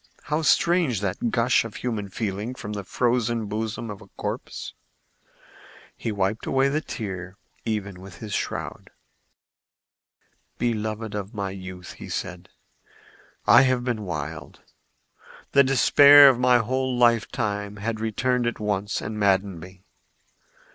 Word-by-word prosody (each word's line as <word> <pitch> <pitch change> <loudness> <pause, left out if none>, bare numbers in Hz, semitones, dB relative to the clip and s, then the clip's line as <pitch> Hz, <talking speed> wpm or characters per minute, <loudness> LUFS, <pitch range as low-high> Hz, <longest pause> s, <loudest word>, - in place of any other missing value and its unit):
How 150 +1 -1
strange 165 - +3
that 100 +4 -1
gush 120 +1 +2
of 115 -2 -9
human 110 -5 -3
feeling 105 +4 -4
from 105 -4 -6
the 100 -1 -4
frozen 120 +1 0
bosom 110 +2 -4
of 100 - -9
a - - -14
corpse! - - -5 1.2
He 115 - -4
wiped 100 +1 -1
away 135 +1 +2
the 150 +3 0
tear, 95 - -6 0.3
even 100 -4 -3
with 95 -1 -11
his 105 -2 -7
shroud. - - -4 1.7
"Beloved 110 -2 -2
of 105 0 -5
my 100 -2 -3
youth," 95 -1 -9 0.2
said - - -5
he, - - -40 0.6
"I - - +8
have 130 -2 +2
been 120 -3 -2
wild. 80 -4 -6 0.9
The 140 - +6
despair 140 +2 +8
of 125 -2 +1
my 125 0 +5
whole 130 +2 -1
lifetime 110 -3 +1
had 110 +2 -3
returned 120 +3 0
at 120 - -3
once 105 -1 -2
and 110 0 -5
maddened 95 -3 +1
me. 90 +2 -13
110 Hz, 135 wpm, -24 LUFS, 100-125 Hz, 1.7 s, I